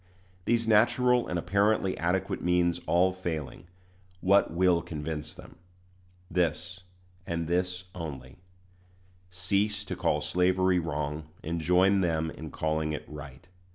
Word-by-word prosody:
These 115 -1 +1
natural 120 +3 +4
and 90 - -2
apparently 100 +2 +1
adequate 95 +3 -1
means 90 -1 +1
all 90 +2 +3
failing, 85 -4 -5 0.5
what 100 +2 +4
will 85 0 +3
convince 75 -1 -5
them? - - -13 0.7
This, 90 +1 -1 0.5
and 85 -1 -2
this 90 +1 -1
only: 75 -7 -7 0.9
cease 100 +3 -1
to - - -4
call - - +1
slavery 90 0 +2
wrong, 75 -2 -3 0.2
and 85 +1 -3
join 95 +4 +4
them 80 -2 0
in 80 - -8
calling 80 +1 -1
it 75 - -4
right. 75 +2 -10
90 Hz, 120 wpm, -28 LUFS, 80-95 Hz, 0.9 s, natural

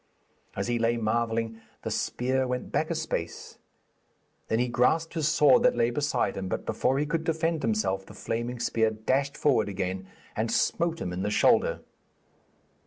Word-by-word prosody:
As - - -2
he 120 -1 0
lay 115 +1 +2
marvelling, 115 0 -1 0.2
the - - -3
spear 130 +1 0
went 125 0 -3
back - - 0
a - - -1
space; - - -4 0.9
then 110 - +1
he 125 +1 +1
grasped 160 +7 +1
his 160 -3 0
sword 165 +9 +5
that 250 0 +4
lay 120 +1 +2
beside 145 -6 0
him, 95 -1 -4
but - - -3
before 130 - +1
he 145 - +1
could 160 +2 -1
defend 165 0 0
himself 95 -4 0
the - - -12
flaming 120 +2 -3
spear 110 -1 +2
dashed 130 +6 -1
forward 120 -8 +2
again 95 -1 -3 0.3
and 115 +1 -1
smote 165 +6 +1
him 90 - -3
in 90 - -3
the 100 - 0
shoulder. 105 - +3
120 Hz, 175 wpm, -27 LUFS, 110-145 Hz, 0.9 s, sword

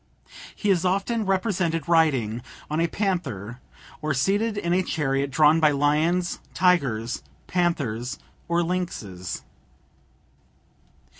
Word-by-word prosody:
He 205 - +1
is 180 -2 +2
often 200 +4 0
represented 185 -4 0
riding 135 -10 +2 0.3
on 155 - 0
a 170 - +3
panther, 155 - -2 0.4
or 155 -2 0
seated 205 - +1
in 170 -4 0
a 185 - +3
chariot 140 -5 -1
drawn 155 +3 +5
by 155 -2 +5
lions, 155 +5 +1 0.2
tigers, 135 -10 +2 0.2
panthers, 140 -9 -1 0.3
or 170 0 +2
lynxes. 115 - -4
165 Hz, 105 wpm, -25 LUFS, 135-180 Hz, 0.4 s, drawn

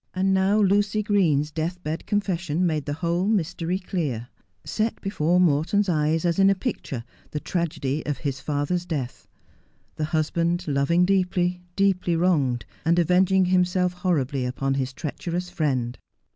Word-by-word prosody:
And 190 +1 +2
now 190 +2 +3
Lucy 205 +1 +2
Green's 165 -9 +2
deathbed 160 0 -4
confession 185 -5 0
made 155 -4 0
the 145 - -2
whole 175 +3 +1
mystery 180 -3 0
clear 150 - -3 0.2
— 90 -2 -46
set 220 - -2
before 180 -3 +1
Morton's 175 +5 +2
eyes, 155 0 +1
as 170 +2 +1
in 195 0 +6
a 195 - +3
picture, 185 - -4 0.3
the 150 - -3
tragedy 155 -4 -2
of 145 - -1
his 140 -3 -3
father's 155 +5 -2
death. 140 -7 -4 0.7
The 155 - 0
husband, 165 +2 0
loving 145 +5 +2
deeply, 180 -2 +1
deeply 190 -3 +2
wronged, 150 -9 +1 0.2
and 170 +2 +2
avenging 185 +2 +4
himself 180 0 +2
horribly 150 -8 0
upon 135 +2 -1
his 135 -1 -1
treacherous 170 +5 -4
friend. 130 -7 -1
170 Hz, 145 wpm, -24 LUFS, 150-185 Hz, 0.7 s, in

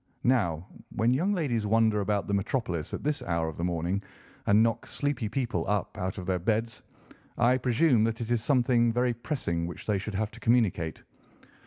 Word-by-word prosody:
Now, 95 -10 +1 0.3
when 115 +2 +3
young 175 +10 +1
ladies 130 - 0
wander 110 -1 +3
about 100 0 0
the 100 - -3
metropolis 95 - -1
at - - -5
this 150 0 0
hour 85 -1 -1
of 80 - -8
the 85 - -3
morning, 90 +2 -1 0.5
and 105 +2 +5
knock 115 -1 0
sleepy 140 -6 -2
people 115 -7 -1
up 105 -1 -1
out 95 +2 -3
of 90 - -5
their 90 0 0
beds, 115 +5 -1 0.6
I 125 +2 +3
presume 125 -1 +3
that 115 0 -2
it 120 0 -4
is 115 -2 +1
something 120 -3 +3
very 125 +1 +1
pressing 115 - -2
which 85 - -8
they 105 -2 +1
have 105 +1 -3
to - - -12
communicate. 105 -9 +1
110 Hz, 185 wpm, -28 LUFS, 95-120 Hz, 0.6 s, and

